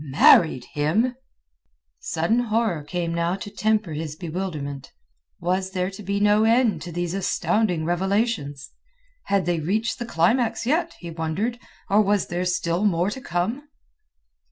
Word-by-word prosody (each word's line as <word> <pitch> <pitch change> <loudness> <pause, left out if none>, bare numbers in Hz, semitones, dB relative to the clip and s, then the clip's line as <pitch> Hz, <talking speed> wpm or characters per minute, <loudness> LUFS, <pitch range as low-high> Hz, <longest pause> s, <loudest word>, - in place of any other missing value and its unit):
"Married 140 -1 +5
him?" 200 +13 +1 0.8
Sudden 170 +9 0
horror 220 -7 0
came 170 +1 -3
now 170 +2 0
to 200 +1 -8
temper 215 -3 0
his 150 0 -4
bewilderment. 155 -5 -5 0.5
Was 185 +2 -1
there 185 +1 -1
to 195 - -10
be 200 0 -2
no 210 +1 +4
end 230 0 +3
to 175 - -7
these 175 0 -2
astounding 195 -2 0
revelations? 175 - -1 0.5
Had 195 -3 +1
they 175 -1 0
reached 210 +9 -1
the 240 - -3
climax 230 +6 +1
yet, 330 +6 0
he 170 -1 -8
wondered, 175 +9 -2 0.3
or 205 +2 +4
was 205 -1 +2
there 175 +1 -2
still 180 0 0
more 185 -1 +2
to 265 - -6
come? 225 - -2
185 Hz, 145 wpm, -24 LUFS, 165-215 Hz, 0.8 s, Married